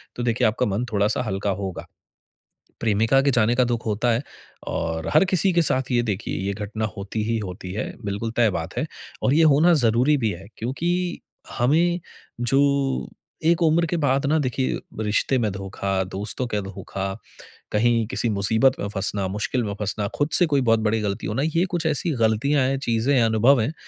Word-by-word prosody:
तो 120 - -3
देखिए 115 -2 +2
आपका 110 - 0
मन 105 +5 -1
थोड़ा-सा 105 +3 +1
हल्का 100 -1 -2
होगा। 95 -2 -5 0.9
प्रेमिका 115 +4 +2
के 140 - +2
जाने 120 -1 +3
का 125 - +4
दुःख 120 -1 -2
होता 115 +3 +1
है 115 +3 +1 0.5
और 80 0 -2
हर - - +6
किसी 190 0 +2
के 170 - +4
साथ 130 -4 +1
ये 120 -1 +3
देखिए 105 -3 -3
ये 100 - -1
घटना 110 +2 -4
होती 105 +2 -3
ही 115 +1 0
होती 90 -2 -6
है, 105 - -4
बिल्कुल 105 +3 -3
तय 115 -2 +4
बात 85 -3 -5
है। - - 0 0.4
और 130 - +3
ये 165 - +5
होना 170 +5 +5
ज़रूरी 125 +7 +3
भी 115 -5 0
है, 95 +2 -9
क्योंकि 175 +9 -2 0.4
हमें 170 +8 +3 0.4
जो 135 +3 +3 0.8
एक 170 +1 +3
उम्र 165 +1 +3
के 175 - -1
बाद 140 -2 +1
ना 155 +2 +3
देखिए 130 -1 -1 0.2
रिश्ते 105 +5 +1
में 110 -3 0
धोखा, 95 0 -2
दोस्तों 100 +6 -4
के 105 -3 -2
धोखा, 95 0 -5 0.6
कहीं 115 +1 +2
किसी 120 - -1
मुसीबत 110 +6 +2
में 100 - -2
फँसना, 100 -1 -2
मुश्किल 105 +5 -2
में 100 - -3
फँसना, 105 0 -2
खुद 145 +1 0
से 175 - +5
कोई 140 -3 +2
बहुत 115 -2 +3
बड़ी 110 0 +1
गलती 105 0 -3
होना, 115 +6 -1
ये 160 +3 +1
कुछ 170 -3 -1
ऐसी 160 +2 +1
गलतियाँ 125 +6 +2
हैं, 135 0 0
चीज़ें 120 +1 +1
हैं, 125 - +4
अनुभव 115 +4 +4
हैं। 135 +8 -1
115 Hz, 190 wpm, -23 LUFS, 105-140 Hz, 0.9 s, हर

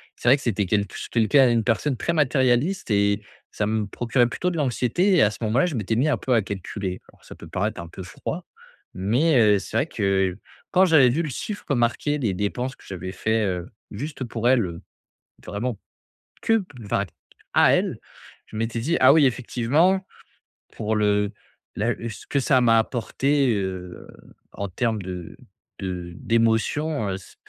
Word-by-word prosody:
c'est - - -6
vrai 130 +4 +7
que - - -12
c'était 105 -4 0
quelque 100 +2 -1
ch - - -6
quelqu'un, 120 +3 +4
une 115 -1 +2
personne 120 +5 +1
très 170 - -1
matérialiste 140 +4 +1
et 100 0 +2 0.3
ça 105 - -1
me 110 -1 0
procurait 120 +4 +1
plutôt 180 +9 -2
de 170 - -4
l'anxiété 145 - +1
et 175 - +5
à 105 - +5
ce - - -8
moment-là, 120 +11 +2
je 155 - -3
m'étais 110 -1 -1
mis 135 +7 +2
un 130 - +2
peu 130 - -1
à 115 - +4
calculer. 95 -1 -5
Alors - - -25
ça - - -11
peut - - -12
paraître 105 +1 -2
un 85 - -7
peu 95 - -10
froid, 90 - -6 0.5
mais, 125 - +2
heu, 105 -3 +5
c'est 110 - -4
vrai 135 - +2
que 95 - 0 0.4
quand 190 +1 +5
j'avais 155 -7 +6
vu 140 +8 +1
le 155 - -3
chiffre 150 - -4
marqué 120 +5 +1
des 115 -9 -1
dépenses 125 +7 -2
que - - -21
j'avais 95 -1 -6
faits, 110 +3 0
heu, 90 -2 -3 0.2
juste 140 +5 -5
pour 120 0 -1
elle, 125 -5 +4
heu, 85 -2 -7 0.7
vraiment 105 +1 -3 0.6
que 225 -2 +2 0.2
enfin - - 0 0.5
à - - +5
elle, - - +1 0.5
je - - -13
m'étais 115 +1 -2
dit: 160 +9 0
«Ah 130 - +7
oui, 155 -2 +5
effectivement, 140 +10 +1 0.7
pour 110 0 -2
le 105 -1 +2 0.4
la 115 +3 0 0.2
ce 110 - -10
que 140 - 0
ça 130 -1 +3
m'a 115 -1 +5
apporté, 135 +3 +1
heu, 95 -2 -5 0.5
en 100 -1 -4
termes 110 +3 -1
de 90 -2 -7 0.4
de 90 -2 -5
d'émotions, 115 - +1
heu, 95 - -2
c 95 - -15
115 Hz, 185 wpm, -24 LUFS, 100-135 Hz, 0.7 s, vrai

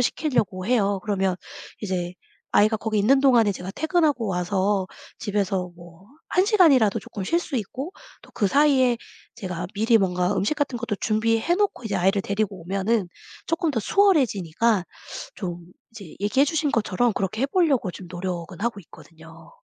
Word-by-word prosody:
시킬려고 240 - 0
해요. 205 -4 +2
그러면 195 -3 0 0.5
이제 180 -3 -3 0.4
아이가 215 +1 +3
거기 220 -1 -2
있는 265 +7 +4
동안에 235 -7 +4
제가 180 +1 -7
퇴근하고 315 -6 +1
와서 190 +2 0 0.3
집에서 195 -4 -1
뭐 175 +2 -15 0.3
1 375 +2 +4
시간이라도 295 - +4
쪼끔 195 -3 -7
쉴 335 - +1
수 320 -5 -4
있고 260 - -5 0.3
또 - - -17
그사이에 260 +2 +3 0.4
제가 180 -2 -5
미리 225 +2 +4
뭔가 180 -1 +1
음식 200 +10 0
같은 285 -5 -2
것도 225 -3 -3
준비해 225 - +1
놓고 400 - -1
이제 210 - -3
아이를 195 +2 +2
데리고 200 -3 -2
오면은 195 +3 0 0.4
쪼끔 330 -1 0
더 245 - -1
수월해지니까 230 - +2 0.5
좀 175 -3 -5 0.3
이제 200 -8 -12
얘기해 260 +8 +2
주신 310 -1 0
것처럼 230 +1 +1
그렇게 195 +5 -2
해볼려고 275 - +2
지금 180 0 -11
노력은 175 0 -5
하고 230 -4 -2
있거든요. 160 -1 -16
210 Hz, 350 characters per minute, -24 LUFS, 185-260 Hz, 0.5 s, 있는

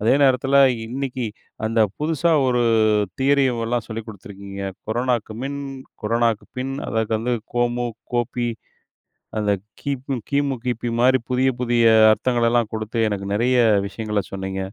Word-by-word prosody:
அதே 110 +4 +3
நேரத்துல, 135 0 +3 0.3
இன்னைக்கு 130 0 -3 0.4
அந்த 115 +1 +1 0.2
புதுசா 160 +2 +1 0.2
ஒரு 125 -1 +2 0.6
தியரி 140 +1 +3
ஓ - - -5
ல்லாம் 120 -1 -1
சொல்லிக் 110 0 -6
குடுத்துருக்கீங்க. 100 -1 -9 0.3
கொரோனாவுக்கு 120 -1 -1
மின், 140 +1 -4 0.4
கொரோனாவுக்கு 115 0 +1
பின், 135 +1 -3
அதற்கு 110 0 -1
வந்து 120 +2 -1 0.2
கோமு 120 0 +1 0.3
கோபி 120 0 0 0.9
அந்த 105 -1 +1 0.3
கிம் 135 -2 -3
கிமு, 140 -1 +1
கிபி 120 -1 -2
மாரி 130 +2 +4
புதிய 130 +1 +3
புதிய 120 -1 +2 0.3
அர்த்தங்களெல்லாம் 120 -1 +1
குடுத்து, 110 +1 -4
எனக்கு 100 -1 -3
நெறைய 120 +5 +2 0.3
விஷயங்கள 105 0 -2
சொன்னீங்க. 95 0 -4
120 Hz, 130 wpm, -22 LUFS, 110-130 Hz, 0.9 s, மாரி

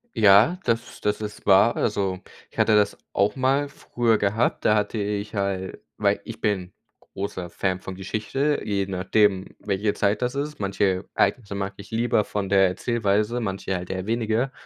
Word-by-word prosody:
Ja, 110 - +6
das, 115 0 -2
das 105 +1 0
ist 105 -1 -7
wahr. 100 +4 +5
Also, 95 -3 -1 0.3
ich - - -22
hatte 110 - +4
das 105 -1 +2 0.2
auch 100 +1 +2
mal 135 +2 +1
früher 120 -4 0
gehabt. 105 +4 0
Da 105 - +5
hatte 105 +1 0
ich 105 +1 -3
halt 95 -1 -2 0.2
weil 100 -1 +2
ich 115 0 -8
bin 95 -4 -1 0.3
großer 95 -3 -6
Fan 95 +1 -1
von 95 0 -7
Geschichte, 110 +10 -1
je 100 -2 -1
nachdem, 95 +1 +1
welche 100 +1 -1
Zeit 105 +2 +1
das 125 +2 -1
ist. 150 +2 -3
Manche 100 -1 0
Ereignisse 100 -5 +1
mag 100 0 -3
ich 100 - -11
lieber 115 -1 +1
von 100 -2 -3
der 95 -1 +5
Erzählweise, 110 +3 0
manche 95 -3 -3
halt 90 0 -5
eher 95 0 -3
weniger. 115 +3 0
105 Hz, 170 wpm, -24 LUFS, 95-115 Hz, 0.3 s, Ja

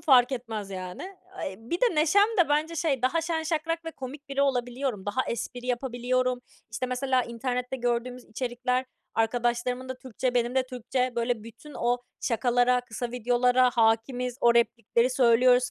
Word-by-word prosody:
fark 260 -4 +5
etmez, 225 -5 -4
yani. 185 -1 -6 0.4
Eee, 190 - -4
bir 240 - -4
de 485 -7 +3
neşem 335 +7 +4
de 345 -4 +5
bence 310 +3 +1
şey, 285 -6 0
daha 265 +6 +2
şen 325 0 -1
şakrak 330 +1 -2
ve 325 - -4
komik 280 0 -9
biri 275 0 +1
olabiliyorum. 245 -5 -1
Daha 255 +6 0
espri 245 +1 -4
yapabiliyorum. 250 0 0 0.3
İşte, 250 +3 -2
mesela 255 0 +1
internette 250 +2 -3
gördüğümüz 245 0 -2
içerikler, 250 +2 -2 0.3
arkadaşlarımın 240 +2 0
da 260 - -3
Türkçe, 255 0 -3
benim 240 0 +1
de 260 -1 +2
Türkçe, 250 0 -2
böyle 235 -1 0
bütün 235 +6 -12
o 245 +1 +1 0.2
şakalara, 245 +2 +2
kısa 240 0 -5
videolara 250 +1 +3
hâkimiz. 240 +2 +1
O 235 0 +5
replikleri 235 +1 +2
söylüyoruz 250 0 +4
250 Hz, 155 wpm, -27 LUFS, 235-265 Hz, 0.4 s, fark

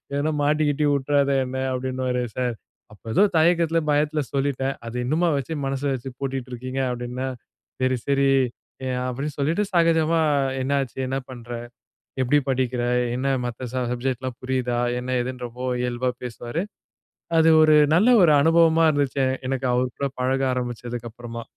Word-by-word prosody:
ஏதனா 145 +2 0
மாட்டிக்கிட்டி 150 0 +1
உட்டுறாத 140 0 +1
என்ன" 130 +1 -5 0.2
அப்படின்னுவாரு. 130 -1 -2
"சார், 125 -2 -1 0.4
அப்போ 105 - -18
ஏதோ 205 - +6
தயக்கத்தில 165 0 +3
பயத்தில 150 +1 +1
சொல்லிட்டேன். 135 -1 -1
அது 115 - -6
இன்னுமா 165 +5 +2
வச்சி, 140 +4 -3
மனசில 135 +1 -1
வச்சு 130 +1 -5
பூட்டிட்டு 135 -2 -3
இருக்கீங்க?" 130 +2 -4
அப்படின்னா. 125 +1 -4 0.6
"சரி, 130 0 +2
சரி" 140 0 +2 0.6
எ - - -1 0.2
அப்டினு 140 +4 -4
சொல்லிட்டு, 160 +9 +1
சகஜமா, 165 -1 +3 0.4
"என்ன 135 +2 -2
ஆச்சு? 135 0 -8
என்ன 135 +1 -1
பண்ற? 120 -1 -10 0.7
எப்படி 130 +3 +3
படிக்கிற? 125 -2 0 0.3
என்ன 130 +2 -2 0.2
மத்த 120 +1 -5
ச - - -4 0.2
சப்ஜெக்ட்லாம் 130 0 -3
புரியுதா?" 125 -2 -1 0.2
என்ன 130 +1 -2
எதுன்னு 125 0 -5
ரொம்ப 125 +2 -11 0.2
இயல்பா 125 +1 -1
பேசுவாரு. 120 +6 -4 0.8
அது 160 0 +5
ஒரு 155 -1 +6 0.2
நல்ல 210 +8 +4
ஒரு 155 - +6
அனுபவமா 165 0 +5
இருந்துச்சு, 140 -2 0 0.2
எனக்கு 130 -1 -1
அவர் 125 0 0
கூட 140 - 0
பழக 135 +1 +1
ஆரம்பிச்சதுக்கு 120 -1 -4
அப்புறமா. 115 0 -8
130 Hz, 145 wpm, -23 LUFS, 125-145 Hz, 0.8 s, ஏதோ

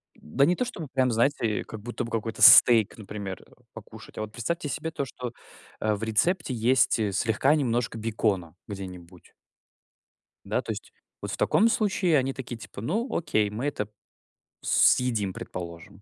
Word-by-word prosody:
да 105 - +1
не 175 - +2
то, 250 - -1
что 235 -6 -8
бы 155 - -5
прям, 130 -2 +2
знаете, 115 -2 +1
э - - -6
как 110 -2 -9
будто 120 +2 -4
бы 115 - -7
какой-то 115 0 -3
стейк, 115 -4 +8
например, 100 -3 -7
э, - - -25 0.2
покушать. - - -13
А - - -3
вот 110 0 -5
представьте 150 +7 -3
себе 155 +3 -3
то, 140 - -3
что, 125 -2 -7 0.5
э, 110 0 +1
в 105 - -5
рецепте 130 - 0
есть, 120 +1 +2
э, 105 -2 0
слегка 115 +8 +2
немножко 120 -5 -1
бекона, 105 -6 -1
где-нибудь. 90 -3 -10 1.1
Да, - - -1
то - - -5
есть. - - -8 0.3
Вот - - -5
в - - -4
таком 225 +2 +3
случае 190 -7 +2
они 135 0 0
такие 125 -3 -7
типа: 100 - -10
"Ну, 215 - -1
окей, 110 -10 +1
мы 110 +7 -4
это, 105 -8 -3 0.7
съедим, 115 -6 +3
предположим". 90 +3 -8
115 Hz, 175 wpm, -26 LUFS, 105-140 Hz, 1.1 s, стейк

